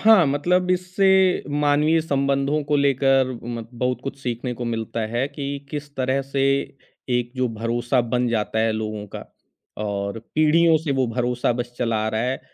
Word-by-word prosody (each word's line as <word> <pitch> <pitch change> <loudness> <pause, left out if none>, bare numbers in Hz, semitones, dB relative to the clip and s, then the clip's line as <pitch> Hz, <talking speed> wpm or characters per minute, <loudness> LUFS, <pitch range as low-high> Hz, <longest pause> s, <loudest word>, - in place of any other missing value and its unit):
हाँ, 215 -6 +7
मतलब 180 +6 +1
इससे 180 +2 +1 0.6
मानवीय 150 +3 +3
संबंधों 140 0 0
को 150 - +3
लेकर 135 -1 +3 0.2
म 120 -1 -5
बहुत 125 0 0
कुछ 135 0 -6
सीखने 125 0 -3
को 120 - -5
मिलता 115 -1 -3
है 120 +3 +1
कि 145 -1 -7 0.3
किस 145 -1 -6
तरह 130 +1 +1
से 135 0 -2 0.8
एक 120 0 -4
जो 130 -1 +1
भरोसा 120 +2 0
बन 125 0 +2
जाता 110 -1 -1
है 110 0 +2
लोगों 110 -1 -4
का। - - -6 0.6
और 100 0 -3 0.2
पीढ़ियों 160 +1 +4
से 155 -2 -2
वो 130 -1 +2
भरोसा 120 +1 0
बस 120 0 -4
चला 115 -2 0
आ - - +1
रहा 110 0 -1
है, 125 +3 -1
130 Hz, 170 wpm, -23 LUFS, 120-145 Hz, 0.8 s, हाँ